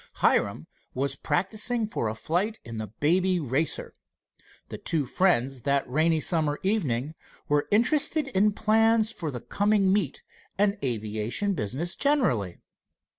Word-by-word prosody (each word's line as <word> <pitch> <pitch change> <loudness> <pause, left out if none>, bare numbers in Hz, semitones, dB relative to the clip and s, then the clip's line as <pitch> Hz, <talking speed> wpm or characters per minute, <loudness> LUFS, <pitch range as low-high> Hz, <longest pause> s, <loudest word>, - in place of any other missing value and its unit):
Hiram - - +1 0.3
was 135 +1 -1
practicing 220 - 0
for 115 - -3
a 110 - -5
flight 185 - -1
in 115 -1 -7
the 110 - -4
Baby 180 - +1
Racer. 145 +2 -2 0.8
The - - -7
two 155 -4 -1
friends 135 -5 +1
that 140 +3 0
rainy 155 +5 +2
summer 155 -2 +2
evening 155 - -1 0.3
were 145 0 +1
interested 290 +7 +3
in 210 -2 +2
plans 220 +1 +3
for 180 -8 -5
the 125 -4 -6
coming 205 -2 +1
meet 190 -9 -1 0.3
and 200 0 +2
aviation 110 - -1
business 140 - -3
generally. 130 - +1
165 Hz, 130 wpm, -26 LUFS, 130-210 Hz, 0.8 s, interested